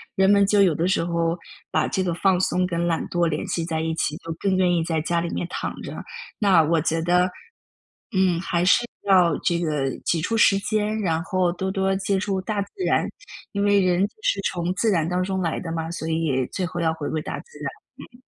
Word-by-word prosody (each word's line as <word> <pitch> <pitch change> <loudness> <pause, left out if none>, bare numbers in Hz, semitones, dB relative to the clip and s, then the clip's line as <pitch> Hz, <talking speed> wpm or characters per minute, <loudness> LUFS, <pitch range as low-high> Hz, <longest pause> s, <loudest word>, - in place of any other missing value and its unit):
人 190 0 +4
们 200 0 +5
就 205 +1 +3
有 185 -4 +4
的 165 +4 0
时 185 - +1
候， 170 0 0 0.3
把 - - +1
这 190 - -1
个 180 -2 0
放 185 +1 +2
松 185 0 +1
跟 170 -1 -1
懒 165 -1 0
惰 175 -1 +1
联 155 -1 -2
系 165 - -2
在 160 -1 -2
一 160 0 -1
起， 150 -2 -1
就 165 - -8
更 195 -1 +1
愿 185 -1 +3
意 170 - +2
在 160 -1 -1
家 170 +2 0
里 170 - -2
面 - - -2
躺 - - -3
着。 - - -7 0.5
那 190 -6 +5
我 165 +2 +2
觉 160 +1 0
得， 180 +2 +3 0.9
嗯， 185 -3 +3
还 175 -1 -1
是 185 +6 +4 0.2
要 180 -5 +5
这 170 -1 0
个 150 -5 -1
挤 165 - 0
出 225 +7 -1
时 200 -3 +5
间， 215 +1 -1
然 165 -4 0
后 185 0 +1
多 190 +2 -3
多 195 0 0
接 195 0 0
触 190 0 -1
大 205 +2 -2
自 200 - -6 0.2
然， - - +2 0.5
因 200 - -2
为 205 -1 +4
人 180 -1 +2
就 - - -26
是 200 - +1
从 175 0 -2
自 220 +4 +1
然 165 -6 +1
当 180 0 0
中 190 0 -1
来 165 -2 -1
的 165 -2 -5
嘛， 165 0 -3
所 160 -1 -5
以 155 -6 0
最 185 - -1
后 175 0 -5
要 160 -1 +1
回 155 -2 -5
归 155 - -2
大 - - -5
自 475 - -15
然。 - - -3 0.4
嗯。 245 - -19
175 Hz, 250 characters per minute, -23 LUFS, 165-190 Hz, 0.9 s, 们